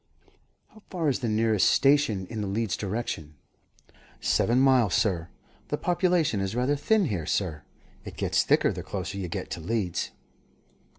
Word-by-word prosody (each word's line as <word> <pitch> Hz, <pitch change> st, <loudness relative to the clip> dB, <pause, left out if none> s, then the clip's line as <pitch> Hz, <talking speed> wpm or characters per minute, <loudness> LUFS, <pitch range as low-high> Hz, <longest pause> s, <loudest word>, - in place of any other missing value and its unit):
"How 215 Hz, -, -18 dB
far 170 Hz, -5 st, 0 dB
is 135 Hz, -, 0 dB
the 120 Hz, -4 st, -2 dB
nearest 110 Hz, -2 st, +3 dB
station 135 Hz, -9 st, +3 dB
in 110 Hz, +3 st, -5 dB
the 100 Hz, -, -2 dB
Leeds 105 Hz, 0 st, -1 dB
direction?" 95 Hz, -7 st, -4 dB, 0.8 s
"Seven 120 Hz, +2 st, +2 dB
miles, 130 Hz, -7 st, +4 dB
sir. 85 Hz, -5 st, 0 dB, 0.4 s
The -, -, -2 dB
population 175 Hz, -, +1 dB
is 95 Hz, +2 st, -2 dB
rather 125 Hz, +4 st, +1 dB
thin 210 Hz, +7 st, +2 dB
here, 95 Hz, -, -3 dB
sir. 80 Hz, -7 st, -1 dB, 0.4 s
It -, -, -10 dB
gets -, -, +1 dB
thicker -, -, +3 dB
the -, -, -5 dB
closer 100 Hz, -, -5 dB
you 95 Hz, -, -3 dB
get -, -, -5 dB
to -, -, -4 dB
Leeds." 95 Hz, 0 st, -2 dB
110 Hz, 160 wpm, -27 LUFS, 95-135 Hz, 0.8 s, miles